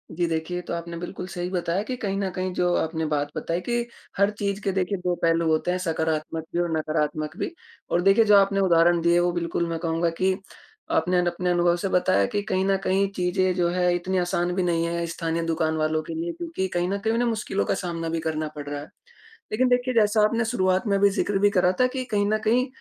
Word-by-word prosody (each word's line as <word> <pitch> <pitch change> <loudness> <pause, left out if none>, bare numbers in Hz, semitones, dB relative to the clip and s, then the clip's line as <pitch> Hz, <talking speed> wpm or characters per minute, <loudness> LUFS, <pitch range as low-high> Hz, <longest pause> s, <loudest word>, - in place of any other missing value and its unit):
जी 175 +1 +1
देखिए, 165 +2 -2
ये - - -3
तो - - -5
आपने 170 0 -5
बिल्कुल 175 +1 -6
सही 180 -1 -4
बताया 180 0 -1
कि 255 +3 -4
कहीं 195 -5 -2
न 195 -1 -1
कहीं 185 +1 -3
जो 180 0 +1
आपने 160 0 -1
बात 145 -1 -1
बताई 170 +1 -2
कि 240 +3 -1 0.3
हर 200 +1 +4
चीज़ 200 0 -2
के 195 - +1
देखिए 190 +1 -1
2 180 -1 -1
पहलू 165 0 +2
होते 160 +2 +1
हैं 180 - 0
सकारात्मक 160 -2 -2
भी 175 - 0
और 175 - -1
नकारात्मक 155 -1 -2
भी। - - -2 0.4
और 175 - +2
देखिए 195 +4 +5
जो 210 -1 +6
आपने 195 0 +3
उदाहरण 170 -2 +4
दिए 170 +1 +4
वो 175 0 +2
बिल्कुल 170 0 -1
मैं 165 - -3
कहूँगा 165 0 0
कि 190 0 +3 0.7
आपने 180 0 +1
न - - -1
अपने 180 +1 -1
अनुभव 175 0 +3
से 195 +2 -2
बताया 140 - +3
कि 205 - -2
कहीं 190 -1 0
न 195 0 +2
कहीं 195 +1 +2
चीज़ें 185 0 +1
जो 175 -1 +2
है 180 0 +2
इतनी 185 +2 -1
आसान 175 0 0
भी 185 - +1
नहीं 170 -1 +1
है 170 0 -2
स्थानीय 165 0 -2
दुकान 160 -1 0
वालों 155 0 +1
के - - -7
लिए 335 +2 -3
क्योंकि 330 - -3
कहीं 175 0 +1
न 200 - 0
कहीं 220 +2 0
उन्हें 240 +1 +1
मुश्किलों 215 -3 -1
का - - +1
सामना 165 -2 -3
भी 165 0 -1
करना 155 -1 -2
पड़ 145 -1 -6
रहा 145 0 -4
है। 145 - -8 0.7
लेक़िन 255 +4 +2
देखिए 250 +1 +1
जैसा 215 -1 +4
आपने 230 +1 +1
शुरुआत 185 -3 +1
में 200 -1 +2
भी 200 - +6
ज़िक्र 200 0 0
भी 205 +1 +5
करा 180 -2 +3
था 255 - +5
कि 255 0 -4
कहीं 205 -1 +2
न 215 +1 +2
कहीं 250 +4 +3
180 Hz, 240 wpm, -25 LUFS, 165-200 Hz, 0.7 s, जो